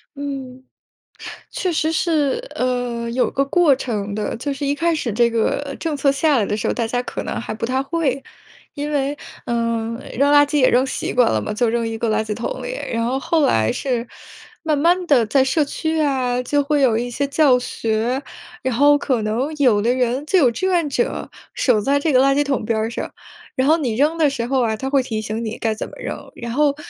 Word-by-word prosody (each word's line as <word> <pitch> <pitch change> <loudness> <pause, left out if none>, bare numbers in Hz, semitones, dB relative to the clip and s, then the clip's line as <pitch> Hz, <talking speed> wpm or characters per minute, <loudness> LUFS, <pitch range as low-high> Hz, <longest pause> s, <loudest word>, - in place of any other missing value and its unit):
嗯， 270 -2 -6 0.9
确 365 -2 -2
实 315 0 +1
是， 325 - 0
呃， 245 -2 -1
有 250 +2 +1
个 275 0 +1
过 315 -2 +4
程 210 -6 -3
的。 215 +1 -3
就 280 +5 -3
是 280 +1 -4
一 280 - +1
开 335 +2 +1
始 260 -6 -2
这 235 +2 +3
个 275 +5 -1
政 315 -3 -2
策 275 0 +2
下 290 +1 +2
来 215 - +2
的 205 - -2
时 - - -2
候， - - 0
大 230 -2 -1
家 245 +2 -1
可 - - -5
能 - - -4
还 225 - -5
不 220 - -5
太 260 +3 0
会。 275 -3 -1 0.5
因 295 0 -4
为， 285 0 0 0.3
嗯， 230 -1 -1 0.2
扔 280 +1 +4
垃 290 0 +7
圾 295 +1 0
也 255 - +5
扔 255 +2 +3
习 - - -3
惯 245 -1 +4
了 110 - +1
嘛， - - -3
就 235 +2 +1
扔 230 0 0
一 225 0 -4
个 230 - -1
垃 215 0 +1
圾 215 - -4
桶 235 - -4
里。 - - -4 0.2
然 230 0 0
后 260 +2 0
后 310 +2 +1
来 110 0 +2
是 245 -3 -2 0.6
慢 310 -3 +1
慢 350 +4 +3
地 250 -7 +4
在 265 +5 +3
社 280 +4 +2
区 315 +2 -2
啊， 260 -4 +1
就 290 +2 +1
会 290 +1 +1
有 235 -4 +4
一 245 +1 -2
些 280 +4 -1
教 280 -3 +4
学， 235 +2 -2 0.4
然 260 -1 -1
后 290 +3 +5
可 255 -7 0
能 235 +8 -1
有 240 -8 +3
的 235 - +2
人， 255 +2 0
就 375 +4 +3
有 270 -8 +5
志 375 +11 -2
愿 345 -5 +1
者 480 - -2 0.3
守 240 -5 +2
在 280 +6 +2
这 300 0 0
个 255 - +5
垃 275 0 +4
圾 290 - +3
桶 275 -5 -1
边 225 0 0
儿 220 +1 0
上， - - -5 0.4
然 260 - +2
后 315 +3 +4
你 245 -8 -1
扔 300 +5 +2
的 305 -3 +4
时 240 -4 -3
候 265 0 +1
啊， 220 -2 0
他 265 +5 -4
会 275 -1 +3
提 220 -3 -3
醒 220 +2 -4
你 220 +1 -5
该 220 -1 0
怎 - - -5
么 - - -12
扔。 - - -6
然 235 -1 -5
后 285 +2 +2
260 Hz, 250 characters per minute, -20 LUFS, 235-290 Hz, 0.9 s, 垃